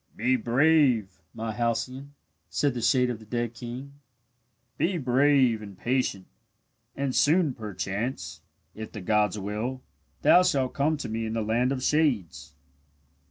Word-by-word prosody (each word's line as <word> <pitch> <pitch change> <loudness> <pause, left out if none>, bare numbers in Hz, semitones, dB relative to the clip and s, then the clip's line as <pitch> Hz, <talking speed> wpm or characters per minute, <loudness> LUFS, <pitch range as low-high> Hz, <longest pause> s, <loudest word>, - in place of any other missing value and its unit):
"Be 125 +4 +2
brave, 125 - +2
my 115 0 -4
Halcyone," 120 +5 -3 0.3
said 145 -3 0
the 120 - -4
shade 125 +2 +3
of 115 - -6
the 110 - -14
dead 120 0 -2
king. 130 +4 -8 0.8
"Be 180 +1 +1
brave 130 -3 +3
and 100 -3 -10
patient, 120 -7 -1 0.7
and 135 -1 -2
soon 155 0 +3
perchance, 100 - -4 0.3
if 110 0 -8
the 105 - -7
gods 105 +2 +1
will, 110 +6 -4 0.4
thou 180 - +7
shalt 135 -8 +1
come 150 +3 +1
to 145 - -5
me 110 +1 -3
in 110 - -4
the 115 -1 -1
land 120 +4 +1
of 130 -2 -2
shades." 95 - 0
120 Hz, 145 wpm, -27 LUFS, 110-135 Hz, 0.8 s, thou